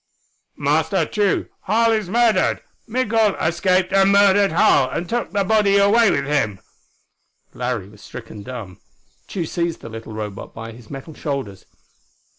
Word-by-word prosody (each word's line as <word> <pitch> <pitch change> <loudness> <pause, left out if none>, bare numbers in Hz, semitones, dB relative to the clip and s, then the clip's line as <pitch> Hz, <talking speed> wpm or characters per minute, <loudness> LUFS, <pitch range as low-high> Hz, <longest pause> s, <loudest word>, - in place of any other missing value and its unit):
"Master - - +1
Tugh, 205 -3 0 0.2
Harl 230 +3 +3
is 215 -5 -1
murdered! 225 -3 +2 0.2
Migul 225 -3 +1
escaped 180 +2 +1
and 195 0 +5
murdered 200 -1 +4
Harl, 140 -5 +4
and 170 - -4
took 240 +4 -2
the 200 -1 0
body 200 0 +3
away 205 +3 +5
with 140 -5 0
him!" 135 -10 0 0.9
Larry 125 -6 -3
was 105 0 -17
stricken 110 -3 -10
dumb. 110 -6 -8 0.5
Tugh 175 -4 -3
seized 170 0 -3
the 115 - -9
little 115 0 -9
Robot 105 -2 -7
by 115 +1 -7
his 115 -1 -15
metal 140 +3 -8
shoulders. 135 - -5
170 Hz, 145 wpm, -21 LUFS, -, 0.9 s, and